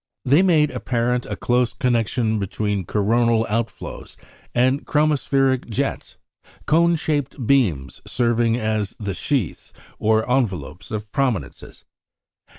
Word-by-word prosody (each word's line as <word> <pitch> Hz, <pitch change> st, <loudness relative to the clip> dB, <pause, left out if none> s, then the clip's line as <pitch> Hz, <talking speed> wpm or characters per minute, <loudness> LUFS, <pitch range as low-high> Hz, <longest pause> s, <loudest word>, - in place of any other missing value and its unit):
They 140 Hz, +7 st, +5 dB
made 155 Hz, -6 st, +3 dB
apparent 125 Hz, 0 st, -1 dB
a -, -, -4 dB
close 125 Hz, 0 st, +1 dB
connection 115 Hz, -2 st, 0 dB
between 100 Hz, -1 st, -2 dB
coronal 115 Hz, +2 st, +2 dB
outflows 115 Hz, +2 st, -4 dB, 0.4 s
and 130 Hz, +4 st, +2 dB
chromospheric 135 Hz, -4 st, +1 dB
jets, 110 Hz, -, -3 dB, 0.5 s
cone 170 Hz, +2 st, +3 dB
shaped 145 Hz, -5 st, -2 dB
beams 90 Hz, -, +1 dB
serving 120 Hz, -1 st, +1 dB
as 110 Hz, -3 st, -2 dB
the 100 Hz, -3 st, -3 dB
sheaths, 115 Hz, -, -2 dB, 0.3 s
or 110 Hz, 0 st, +2 dB
envelopes, 95 Hz, -, -2 dB
of 105 Hz, -1 st, -5 dB
prominences. 130 Hz, -8 st, -3 dB
120 Hz, 110 wpm, -22 LUFS, 110-135 Hz, 0.5 s, They